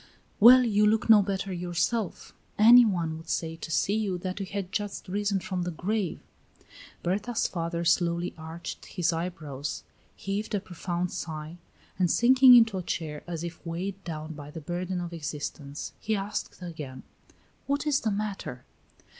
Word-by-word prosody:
"Well, 250 +4 +9
you 210 -3 +3
look 220 +1 +3
no 210 -2 +8
better 195 -1 -2
youself. 180 +4 -2 0.2
Any 235 +3 +9
one 170 -6 -1
would 160 0 -12
say, 165 -1 -1
to 165 - -7
see 190 +4 +1
you, 210 -4 0
that 185 +2 -4
you 195 - -4
had 195 -1 -4
just 205 -1 -4
risen 200 +1 0
from 185 -2 -3
the 175 - -2
grave." 185 +2 -2 0.8
Berta's 210 +6 0
father 170 -1 -3
slowly 175 0 +1
arched 160 +1 -7
his 175 -3 0
eyebrows, 155 -5 -4 0.3
heaved 205 +2 -3
a - - +1
profound 175 -1 -3
sigh, 155 +1 -6 0.4
and 180 -2 +3
sinking 255 +3 +7
into 225 -5 +5
a - - -3
chair, 155 -4 -4
as 170 -2 -4
if 170 0 -7
weighed 185 +4 -4
down 155 -2 -6
by 145 -1 -9
the 160 - -7
burden 180 +3 -3
of 175 -1 -6
existence, 150 -2 -5
he 220 0 -1
asked 195 -2 -4
again: 150 -7 -7 0.6
"What 285 +2 0
is 290 -3 +2
the 220 - -1
matter?" 200 -11 -4
180 Hz, 165 wpm, -28 LUFS, 165-205 Hz, 0.8 s, Well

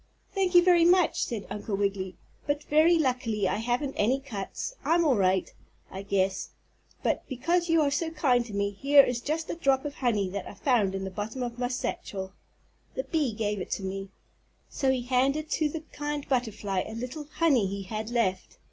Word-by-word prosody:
"Thank 380 -2 0
you 350 - +9
very 350 -2 +5
much," 355 0 +4
said 225 -4 -5
Uncle 205 0 -3
Wiggily, 195 -2 -1 0.3
"but 290 0 0
very 315 +4 +4
luckily 245 -8 0
I 190 - 0
haven't 245 +5 -1
any 250 +6 +2
cuts. 230 - -5
I'm 340 +1 +3
all 275 -5 +4
right, 190 -2 +1 0.4
I 190 - -6
guess, 195 -1 0 0.5
but - - +1
because 335 +7 0
you 330 -1 +4
are 285 - +1
so 320 +3 0
kind 275 -7 +2
to 215 - -9
me 200 0 0
here 275 +7 +6
is 245 -2 -1
just 315 +4 -2
a - - -3
drop 275 -4 +1
of 290 - -3
honey 220 -8 0
that 200 +1 -5
I - - -9
found 210 -5 +2
in 195 - -3
the 190 - -4
bottom 220 +6 -4
of 240 0 -5
my 245 - +1
satchel. 195 -6 -4 0.6
The - - -1
bee 305 - 0
gave 210 -2 -2
it - - -6
to 195 - -4
me." 195 +1 -4 0.6
So 270 - 0
he 260 -2 +1
handed 270 +5 +1
to 310 -2 +1
the 315 +1 -5
kind 295 -1 -4
butterfly 215 -7 -1
a 220 - -7
little 255 +6 -5
honey 280 - +3
he 200 +1 -4
had 215 +3 -5
left. 230 -6 -1
245 Hz, 200 wpm, -28 LUFS, 200-295 Hz, 0.6 s, you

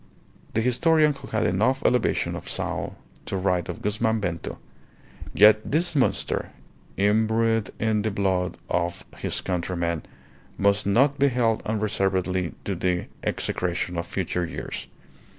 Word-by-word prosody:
The 110 - +3
historian 150 +5 +3
who 140 - -11
had 110 - 0
enough 120 +9 +1
elevation 125 -2 +2
of - - -7
soul - - -3 0.3
to 95 - -2
write 90 -2 0
of - - -6
Guzman 110 +2 +1
Bento: 90 -4 -3 0.7
"Yet 105 +1 +7
this 165 +3 0
monster, 135 - +1 0.5
imbrued 110 +2 +2
in 110 -1 +1
the 110 - 0
blood 95 -3 0
of 85 0 -1
his - - -2
countrymen, 85 -2 -1 0.6
must 100 +1 +2
not 135 +7 +3
be 140 - +5
held 120 -4 +1
unreservedly 95 -4 0
to 100 - -1
the 90 -1 0 0.2
execration 90 0 -2
of 85 - -4
future 90 -1 -2
years. 85 - -5
105 Hz, 135 wpm, -25 LUFS, 90-115 Hz, 0.7 s, Yet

